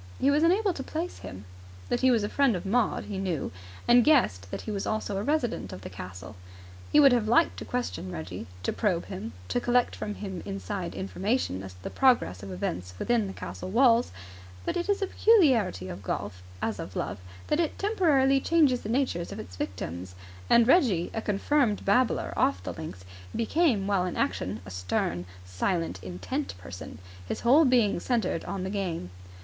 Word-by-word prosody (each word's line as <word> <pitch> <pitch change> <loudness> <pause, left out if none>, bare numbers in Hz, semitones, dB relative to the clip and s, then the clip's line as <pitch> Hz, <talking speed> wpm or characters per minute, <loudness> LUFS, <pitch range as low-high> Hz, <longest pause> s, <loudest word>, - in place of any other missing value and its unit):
He 275 - +4
was 295 +2 +3
unable 375 +4 +3
to 275 - -6
place 325 +6 -4
him. 95 +2 -9 0.4
That - - +1
he 260 - +5
was 230 -4 +3
a - - 0
friend 275 -1 +2
of 180 - -5
Maud 230 +3 +1
he 200 -2 -5
knew, 180 -6 -2 0.4
and 240 0 +7
guessed 105 - +3
that - - -5
he 220 - -5
was 200 -2 -3
also 215 -2 -2
a - - -1
resident 280 -4 -1
of 90 - -8
the 95 - -8
castle. 90 0 -9 0.6
He - - +6
would 280 -2 +8
have 235 -3 +2
liked 310 +9 +3
to - - -6
question 245 - -3
Reggie, 90 +3 -6 0.2
to - - 0
probe 185 -6 0
him, 110 +3 -6 0.2
to 245 - 0
collect 245 0 +2
from 210 - -4
him 190 -4 -6
inside 195 -2 -4
information 195 - -1
as 95 -1 -8
to 90 - -18
the - - -5
progress 240 - +3
of 100 -1 -7
events 90 0 -4
within 235 - +1
the 195 - -6
castle 185 - -7
walls; 235 +2 +4 0.5
but - - -1
it 350 +3 -2
is 405 0 +2
a - - +3
peculiarity 260 - +3
of 95 +1 -7
golf, 90 -1 -4 0.2
as 110 -3 -1
of 95 - -7
love, - - -3 0.3
that 300 - 0
it 330 -3 0
temporarily 305 -10 +3
changes 290 -7 +3
the 210 - -6
natures 235 -9 0
of - - -6
its 90 - -9
victims; 90 -1 -5 0.3
and 235 -1 +6
Reggie, 240 - +3
a 225 - -2
confirmed 215 +2 +1
babbler 235 +4 +2
off 90 0 +1
the - - -4
links, 90 +3 -8 0.3
became 235 - +2
while 195 -2 +1
in 180 - -4
action 95 +2 -1
a 95 - -9
stern, 90 -1 -2 0.2
silent, 95 - -2
intent 90 0 -4
person, 90 0 -9 0.3
his - - -3
whole 280 +7 +6
being 240 -8 +3
centred 240 +3 0
on 190 -2 -4
the 190 - -3
game. 175 - -3
205 Hz, 195 wpm, -28 LUFS, -, 0.6 s, would